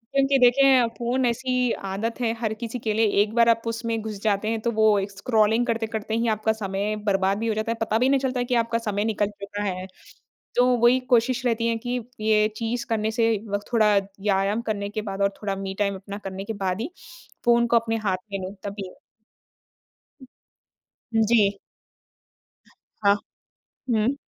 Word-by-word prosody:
क्योंकि 275 0 +4
देखिए, 255 0 +5
फ़ोन 245 +3 0
ऐसी 250 0 0 0.2
आदत 225 +5 -3
है, 230 -2 +1
हर 220 -2 -1
किसी 235 +2 -5
के 220 -2 -1
लिए, 225 +1 +3 0.2
एक 215 - -7
बार 235 0 +5
आप 230 0 +3
उसमें 230 0 -2
घुस 215 -2 -6
जाते 210 -1 +1
हैं 225 0 -1
तो 235 - 0
वो 215 -2 +4 0.2
स्क्रॉलिंग 220 +2 +2
करते-करते 225 -2 -2
ही 230 +1 0
आपका 220 +1 0
समय 205 0 -2
बर्बाद 195 0 +2
भी 230 - -2
हो 220 - +1
जाता 220 +1 -1
है। 230 - -3
पता 220 -1 +1
भी 250 +3 +3
नहीं 275 0 +3
चलता 260 -1 -1
है 245 - 0
कि 245 - 0
आपका 230 0 -1
समय 210 -2 -2
निकल 210 -2 0
चुका 205 +1 -5
है। 185 -2 -3 0.7
तो 245 - +5
वही 240 +2 +5
कोशिश 245 +1 +2
रहती 230 -1 +1
है 230 -1 0
कि, 245 +2 -3 0.2
ये 215 0 +3
चीज़ 230 +1 -2
करने 220 -1 0
से 225 0 +2
व 205 0 0
थोड़ा 215 -3 +4
व्यायाम 195 +1 0
करने 205 -3 -3
के 215 +1 -3
बाद 200 -2 -5
और 200 - +4
थोड़ा 200 -2 -2
मी 195 0 -5
टाइम 200 -1 +1
अपना 200 +1 -8
करने 190 0 -5
के 225 - -4
बाद 185 +3 -1
ही 285 +9 -4 0.5
फ़ोन 235 0 +4
को 235 - +2
अपने 225 0 0
हाथ 185 -1 +1
में 195 - -2
लूँ 190 - -7
तभी 200 -2 -6 2.2
जी। 215 -3 +3 1.5
हाँ। 200 0 +6 0.8
हुँ। 225 +4 +2
220 Hz, 185 wpm, -24 LUFS, 205-235 Hz, 2.2 s, हाँ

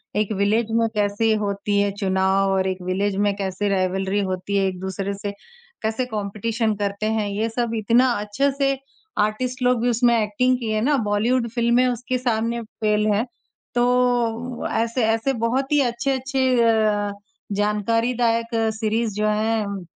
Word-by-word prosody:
एक 210 0 0
विलेज 215 +3 +1
में 230 0 +2
कैसे 210 +2 +1
होती 200 0 -1
है 200 0 +2
चुनाव 190 0 +2
और 190 0 +1
एक 185 -1 -3
विलेज 190 +2 -1
में 205 - +2
कैसे 200 +1 -2
राइवलरी 190 +1 0
होती 185 +2 -2
है 195 - +2
एक-दूसरे 190 +2 -3
से, 200 +1 -5 0.5
कैसे 220 +3 -1
कॉम्पिटिशन 220 0 -2
करते 200 +1 -2
हैं, 220 -2 0
ये 215 +3 -1
सब 235 0 -2
इतना 230 +4 +3
अच्छे 210 +7 0
से 275 -1 +1 0.4
आर्टिस्ट 250 +5 -1
लोग 250 -2 +3
भी 245 - +2
उसमें 235 0 +3
एक्टिंग 235 +5 +1
किए 220 -3 -1
ना, 290 +6 +2
बॉलीवुड 230 +4 +1
फ़िल्में 235 +2 +2
उसके 250 +1 -1
सामने 235 -1 -1
फ़ेल 215 -1 -1
हैं। 215 +4 +1 0.5
तो 245 -1 +1
ऐसे-ऐसे 225 +2 +1
बहुत 265 +4 0
ही 295 - +4
अच्छे-अच्छे 260 +2 0 0.2
अ, 215 -2 +2 0.4
जानकारी 210 +4 +1
दायक 230 -1 +1 0.3
सीरीज़ 220 0 0
जो 210 +1 +1
हैं, 210 -3 -1
220 Hz, 150 wpm, -22 LUFS, 205-240 Hz, 0.5 s, ही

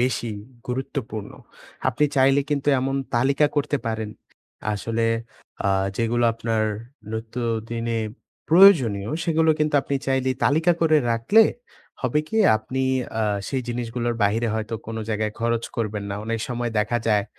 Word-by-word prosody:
বেশি 120 -2 0 0.4
গুরুত্বপূর্ণ? 125 -4 -4 0.6
আপনি 130 +4 +1
চাইলে 135 +1 +5
কিন্তু 145 0 0
এমন 135 +1 -1 0.2
তালিকা 135 +4 +3
করতে 145 0 +1
পারেন। 110 -1 -2 0.6
আসলে 115 +2 -1 0.6
আ - - +3 0.3
যেগুলো 120 +1 +1
আপনার 115 -1 -1 0.5
নিত্য 110 +2 -4 0.3
দিনে 115 0 -1 0.5
প্রয়োজনীয় 135 - +6
সেগুলো 160 -1 +3
কিন্তু 150 -1 +1
আপনি 140 - -3
চাইলে 130 -1 +1
তালিকা 160 +4 +4
করে 155 -2 +4
রাখলে, 115 - +5 0.6
হবে 130 +4 +1
কি? 220 - -3 0.2
আপনি 130 +5 -4 0.4
আ - - +2 0.3
সেই 130 -2 -1
জিনিসগুলোর 120 0 -2
বাইরে 115 +4 +1
হয়তো 110 +1 -3
কোনো 115 0 -4
জায়গায় 105 0 -1
খরচ 115 0 0
করবেন 105 -3 -2
না। - - -2
অনেক 115 0 -2
সময় 120 -1 -2
দেখা 105 +3 +1
যায়, 105 -2 +3
120 Hz, 140 wpm, -23 LUFS, 110-135 Hz, 0.6 s, প্রয়োজনীয়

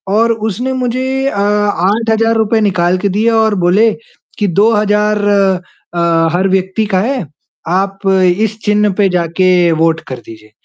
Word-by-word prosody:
और 230 +2 +3
उसने 225 +4 -3
मुझे 255 0 -2 0.2
अ, 205 - -2
₹8000 215 +2 +1
निकाल 185 -3 +1
के 200 +2 -1
दिए 210 +4 +1
और 220 -2 +2
बोले 210 +6 +3 0.5
कि, 205 - +1
"2000 210 +2 +1 0.8
अ, 170 -1 +1
हर 185 +2 +1
व्यक्ति 190 +3 -1
का - - +3
है, 255 -1 -2 0.4
आप 195 +3 -1
इस 190 +3 +1
चिन्ह 210 0 +2
पे 200 -2 +2
जाके 180 0 +1
वोट 165 0 +1
कर 130 - -5
दीजिए।" 110 -1 -13
205 Hz, 140 wpm, -13 LUFS, 180-220 Hz, 0.8 s, और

